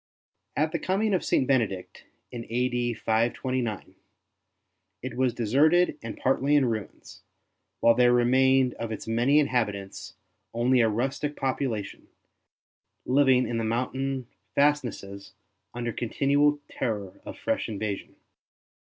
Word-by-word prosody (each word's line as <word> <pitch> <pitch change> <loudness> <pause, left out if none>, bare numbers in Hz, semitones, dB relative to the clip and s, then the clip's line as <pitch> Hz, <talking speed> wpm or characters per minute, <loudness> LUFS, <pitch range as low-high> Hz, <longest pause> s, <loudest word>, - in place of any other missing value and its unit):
At 155 +1 +1
the 170 - -2
coming 200 +3 0
of 185 - +1
St. 130 - +1
Benedict 115 -9 -1 0.3
in 120 -2 -6
a.d. 120 0 0
529 115 0 -1 1.1
it - - -5
was 130 -1 +2
deserted 150 +9 +3
and 115 -1 -7
partly 135 +2 +1
in 140 -2 +4
ruins, 110 -4 -5 0.6
while 115 - +6
there 120 +1 +4
remained 130 +1 +3
of 115 -1 -4
its 110 - -5
many 120 +6 +2
inhabitants 105 -8 -2 0.4
only 125 +2 +3
a 115 - +3
rustic 135 +6 -2
population, 125 -6 -3 1.0
living 130 -1 +3
in 115 -1 -2
the - - -1
mountain 130 +3 -2 0.3
fastnesses 120 -9 -1 0.4
under 120 -1 -4
continual 145 +4 +1
terror 105 -6 -4
of - - -9
fresh - - -2
invasion. 105 -2 -4
125 Hz, 120 wpm, -26 LUFS, 115-135 Hz, 1.1 s, while